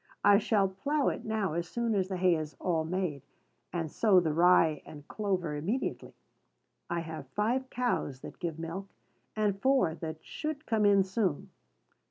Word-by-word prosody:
I 205 Hz, 0 st, +7 dB
shall 205 Hz, -2 st, +2 dB
plough 275 Hz, +10 st, 0 dB
it -, -, -5 dB
now 215 Hz, -6 st, -1 dB
as 170 Hz, 0 st, -3 dB
soon 235 Hz, +3 st, -1 dB
as 190 Hz, -3 st, +1 dB
the 190 Hz, -1 st, -3 dB
hay 180 Hz, 0 st, +4 dB
is 155 Hz, -2 st, -3 dB
all 165 Hz, -3 st, 0 dB
made, 165 Hz, -4 st, -2 dB, 0.5 s
and 165 Hz, -3 st, -3 dB
sow 205 Hz, -5 st, +5 dB
the 160 Hz, -3 st, 0 dB
rye 165 Hz, -3 st, +4 dB
and 145 Hz, -1 st, -12 dB
clover 185 Hz, -7 st, -2 dB
immediately. 195 Hz, -, -3 dB, 0.7 s
I 170 Hz, 0 st, -1 dB
have 160 Hz, -4 st, -7 dB
five 240 Hz, -, -1 dB
cows 240 Hz, -, -1 dB
that -, -, -10 dB
give 165 Hz, -3 st, -3 dB
milk, 165 Hz, +4 st, -5 dB, 0.5 s
and 205 Hz, -2 st, 0 dB
four 260 Hz, -12 st, +3 dB
that 160 Hz, -1 st, -7 dB
should 305 Hz, -1 st, -5 dB
come 215 Hz, -2 st, +2 dB
in 200 Hz, -1 st, +5 dB
soon. 190 Hz, -5 st, -1 dB
185 Hz, 170 wpm, -30 LUFS, 165-215 Hz, 0.7 s, I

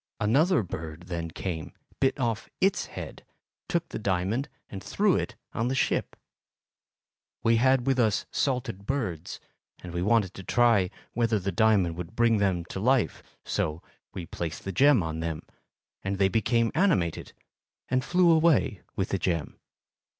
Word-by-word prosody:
Another 145 Hz, -, +3 dB
bird 80 Hz, -2 st, -7 dB
then 85 Hz, -2 st, -3 dB
came, 80 Hz, -2 st, -5 dB, 0.3 s
bit 135 Hz, +1 st, +1 dB
off 115 Hz, -4 st, -1 dB
its 195 Hz, +1 st, +2 dB
head, -, -, -8 dB, 0.5 s
took 170 Hz, -1 st, 0 dB
the -, -, -5 dB
diamond 100 Hz, -, -1 dB, 0.2 s
and 95 Hz, -2 st, -8 dB
threw 205 Hz, -2 st, +2 dB
it 125 Hz, -, -2 dB, 0.2 s
on 115 Hz, -, -1 dB
the 130 Hz, -, 0 dB
ship. 130 Hz, -, 0 dB, 1.3 s
We 115 Hz, 0 st, +4 dB
had 130 Hz, +1 st, +3 dB
with 135 Hz, -1 st, +2 dB
us 110 Hz, -3 st, +2 dB
salted 125 Hz, -7 st, -2 dB
birds, 110 Hz, -, -3 dB, 0.4 s
and 90 Hz, -1 st, -7 dB
we 85 Hz, -, -1 dB
wanted 105 Hz, -1 st, +2 dB
to 95 Hz, -, -9 dB
try 115 Hz, -4 st, +3 dB, 0.2 s
whether 115 Hz, -2 st, +2 dB
the 100 Hz, 0 st, -2 dB
diamond 95 Hz, -4 st, +3 dB
would 90 Hz, 0 st, -7 dB
bring 115 Hz, -1 st, +4 dB
them 95 Hz, -4 st, +1 dB
to -, -, -4 dB
life, 125 Hz, +3 st, +2 dB, 0.2 s
so 80 Hz, +2 st, -2 dB, 0.3 s
we 90 Hz, -, -6 dB
placed 80 Hz, -1 st, -5 dB
the 95 Hz, -, -3 dB
gem 130 Hz, +1 st, +5 dB
on 80 Hz, 0 st, -4 dB
them, 80 Hz, -2 st, -3 dB, 0.6 s
and 95 Hz, 0 st, -2 dB
they 95 Hz, 0 st, +3 dB
became 115 Hz, +2 st, +2 dB
animated 155 Hz, -, +1 dB, 0.5 s
and 130 Hz, 0 st, +1 dB
flew 180 Hz, +2 st, +4 dB
away 160 Hz, -, +3 dB
with -, -, -1 dB
the -, -, -1 dB
gem. 85 Hz, -6 st, -2 dB
110 Hz, 155 wpm, -27 LUFS, 90-130 Hz, 1.3 s, gem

